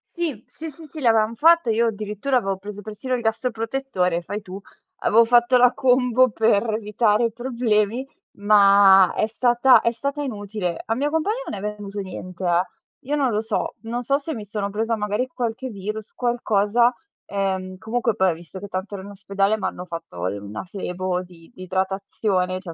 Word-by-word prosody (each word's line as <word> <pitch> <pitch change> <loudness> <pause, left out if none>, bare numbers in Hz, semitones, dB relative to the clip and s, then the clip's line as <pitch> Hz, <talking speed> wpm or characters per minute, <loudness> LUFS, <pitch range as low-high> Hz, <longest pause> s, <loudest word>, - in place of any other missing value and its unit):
Sì, 315 - -3
sì, 320 0 -8
sì, 315 +2 -13
sì, 305 +1 -10
l'avevam 225 -3 +3
fatto. 330 -2 +4
Io 230 +1 +2
addirittura 215 +5 -1
avevo 195 -4 -1
preso 205 +1 -8
persino 220 +4 -3
il 240 - -3
gastroprotettore, 225 -5 -1
fai 205 +4 -6
tu. 190 +1 -8 0.4
Avevo 230 +2 +4
fatto 240 +2 +4
la 250 0 +5
combo 255 -1 +3
per 220 0 +2
evitare 215 +1 +1
i 230 - 0
problemi, 235 0 0 0.3
ma 200 -2 +6
è - - +2
stata 240 +3 +4
è 235 - +1
stata 280 +5 -3
inutile. 205 -8 -4
Al 225 +2 -1
mio 290 +2 0
compagno 320 +9 0
non 205 - -4
è - - -7
venuto 205 0 -7
niente, 185 -1 -8
eh. 175 0 +3 0.5
Io 295 - 0
non 270 -5 +1
lo 210 +1 0
so, 220 -2 -2
non 235 +2 -4
so 275 +4 +1
se 310 0 -5
mi 210 -2 -7
sono 205 -1 -3
presa 225 +3 -1
magari 210 +3 -1
qualche 250 0 -4
virus, 210 +1 -6
qualcosa, 235 -1 +2 0.3
ehm, 190 -2 -2
comunque, 230 +1 -1
poi 190 -3 +3
ho - - +1
visto 170 +2 -10
che 205 - -7
tanto 190 +2 -5
ero 190 - -6
in 200 - -9
ospedale, 200 +1 0
m'hanno 180 -3 -4
fatto 165 - -5
l 100 +2 -3
una 100 +1 -7
flebo 185 -1 -3
di 170 0 -17
di 185 - -9
idratazione, 190 0 -1
cioè - - -14
215 Hz, 185 wpm, -23 LUFS, 195-245 Hz, 0.5 s, ma